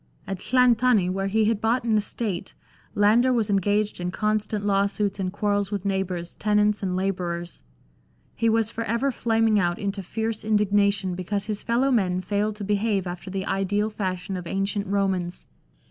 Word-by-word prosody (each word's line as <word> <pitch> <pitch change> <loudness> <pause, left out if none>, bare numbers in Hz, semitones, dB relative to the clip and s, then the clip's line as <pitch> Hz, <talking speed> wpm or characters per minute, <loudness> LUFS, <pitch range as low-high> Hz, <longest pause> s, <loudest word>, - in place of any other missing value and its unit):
At 195 -2 -4
Llanthony, 245 -5 +3
where 195 +1 -1
he 215 +2 +2
had 215 -1 +1
bought 230 +3 +1
an 225 -2 +1
estate, 205 -3 -3 0.4
Landor 225 +5 +4
was 225 -4 +1
engaged 205 +1 +1
in 175 0 -2
constant 210 +1 -1
law 200 0 +3
suits 200 0 -2
and 185 -1 -1
quarrels 205 0 0
with 200 -2 -4
neighbours, 185 -3 -2
tenants, 210 0 +1
and 185 -2 -1
labourers. 175 -2 -3 0.7
He 230 0 +1
was 225 0 +2
for 230 - -3
ever 235 +6 0
flaming 225 -2 +2
out 175 -2 +1
into 200 0 -3
fierce 220 +4 -3
indignation 205 -2 +2
because 195 +3 -2
his 210 -1 -3
fellow 250 +4 +1
men 185 -7 +2
failed 205 +3 -1
to 210 - -7
behave 205 -1 0
after 175 +1 -6
the 190 0 -3
ideal 205 +2 0
fashion 185 -2 -3
of 180 -2 -6
ancient 195 +2 -1
Romans. 190 -3 -1
205 Hz, 170 wpm, -25 LUFS, 190-215 Hz, 0.7 s, Landor